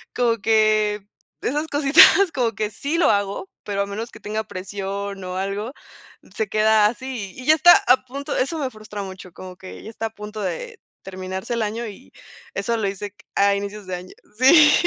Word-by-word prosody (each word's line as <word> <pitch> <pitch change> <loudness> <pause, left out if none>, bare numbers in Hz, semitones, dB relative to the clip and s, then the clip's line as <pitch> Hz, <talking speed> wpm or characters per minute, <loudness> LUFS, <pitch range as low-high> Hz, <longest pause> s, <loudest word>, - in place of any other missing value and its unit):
Como 235 -2 +2
que 215 -1 +2 0.3
esas 300 +4 -1
cositas, 310 +6 +6
como 245 -4 +1
que 210 +1 -2
sí 280 +9 -3
lo 340 - +4
hago, 200 - -1
pero 200 -1 -2
a - - -4
menos 215 +4 -6
que - - -13
tenga 215 +1 -3
presión 195 0 -5
o 180 0 -5
algo, 200 +4 -3 0.6
se 220 - -1
queda 215 0 +4
así, 240 -4 -5
y 255 - -9
ya 310 - +6
está 350 +3 +8
a 250 +1 +5
punto. 280 +3 -5
Eso 295 +6 -1
me 275 -3 -1
frustra 215 -2 -8
mucho, 190 -1 -9
como 185 0 -10
que 185 0 -11
ya - - -8
está 225 0 -5
a - - -9
punto 210 +1 -7
de 180 -4 -5 0.2
terminarse 190 +3 -5
el 230 - -1
año 225 +3 -3
y 215 +5 -12 0.4
eso 235 0 -1
lo 215 -3 -1
hice 195 +1 -4
c 205 - -39 0.2
a 200 0 +4
inicios 200 0 -6
de 185 - -3
año. 180 +1 -10 0.3
Sí. 295 +4 +7
215 Hz, 200 wpm, -22 LUFS, 200-250 Hz, 0.6 s, está